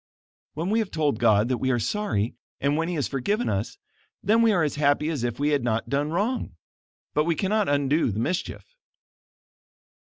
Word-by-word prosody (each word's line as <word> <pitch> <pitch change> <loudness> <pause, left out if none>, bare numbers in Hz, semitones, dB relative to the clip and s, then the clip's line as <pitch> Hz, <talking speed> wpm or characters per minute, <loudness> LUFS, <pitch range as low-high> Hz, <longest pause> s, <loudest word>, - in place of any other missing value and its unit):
"When 165 +6 -2
we 225 - +3
have 215 -4 -1
told 150 - 0
God 110 -2 +4
that 125 -2 0
we 130 - 0
are 125 - +2
sorry, 115 - -1 0.3
and 140 +1 +1
when 165 +1 0
he 175 - -2
has 145 - 0
forgiven 205 - -1
us, 100 +2 -2 0.5
then 220 +4 +4
we 230 -1 +5
are 175 -5 +2
as 150 - 0
happy 145 +1 +2
as 150 -7 -2
if 120 0 -2
we 145 +1 +2
had 145 -4 +1
not 115 -1 -1
done 145 +3 0
wrong; 205 - -1 0.6
but 150 +1 +2
we 170 -1 +1
cannot 205 +2 +1
undo 145 +1 +2
the 100 - -4
mischief." 180 +10 -2
150 Hz, 195 wpm, -25 LUFS, 125-180 Hz, 0.6 s, we